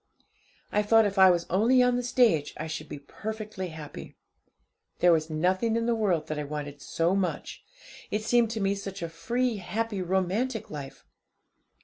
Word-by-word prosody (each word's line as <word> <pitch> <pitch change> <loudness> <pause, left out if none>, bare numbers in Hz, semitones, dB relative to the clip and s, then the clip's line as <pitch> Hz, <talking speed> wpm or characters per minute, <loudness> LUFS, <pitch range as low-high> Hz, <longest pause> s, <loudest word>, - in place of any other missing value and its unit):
I 210 - +2
thought 225 +1 +5
if 200 -1 -1
I 190 0 +9
was 170 -1 +2
only 235 +7 +4
on 250 0 +3
the 245 - 0
stage 240 - +2
I 155 - -4
should 155 -1 -6
be - - -6
perfectly 210 +5 -6
happy. 160 -3 -9 0.8
There 175 - +5
was 160 -1 +2
nothing 185 +8 +1
in 230 0 0
the 235 - +2
world 200 -8 +1
that 155 -1 -4
I - - -2
wanted 145 -1 -6
so 170 +6 0
much; 195 -2 -3 0.5
it 210 +1 -2
seemed 235 0 +3
to 225 0 -3
me 195 0 +2
such 195 -2 -6
a 170 - -3
free, 235 +9 -1
happy, 210 +1 -3
romantic 190 +6 -1
life. 135 -3 -8
195 Hz, 175 wpm, -28 LUFS, 160-225 Hz, 0.8 s, I